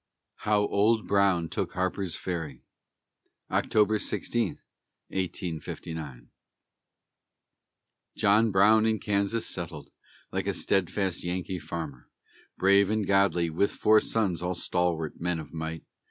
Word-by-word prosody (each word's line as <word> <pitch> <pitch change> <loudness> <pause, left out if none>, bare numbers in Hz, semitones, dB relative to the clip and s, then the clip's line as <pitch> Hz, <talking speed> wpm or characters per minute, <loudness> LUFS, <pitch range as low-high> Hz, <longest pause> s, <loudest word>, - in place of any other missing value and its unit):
HOW 105 -1 +2
OLD 110 +3 +2
BROWN 100 -4 +3
TOOK - - -3
HARPER'S 95 -1 -2
FERRY 80 -8 -5 0.9
[October 105 0 +2
16, 115 -2 -1 0.5
1859] 80 -6 -5 1.9
John 105 +3 +4
Brown 110 +3 +5
in 110 -1 +2
Kansas 105 +2 0
settled, - - -5 0.4
like - - -2
a - - 0
steadfast 95 -1 0
Yankee 90 +1 -3
farmer, 80 -5 -7 0.5
Brave 100 +1 +4
and 110 -1 0
godly, 95 -4 +2
with 95 +6 +1
four 110 0 +5
sons, 100 -7 0
all 90 +1 -2
stalwart 85 -3 -1
men 90 -1 -1
of 80 - -10
might. 80 0 -5
95 Hz, 110 wpm, -28 LUFS, 85-105 Hz, 1.9 s, Brown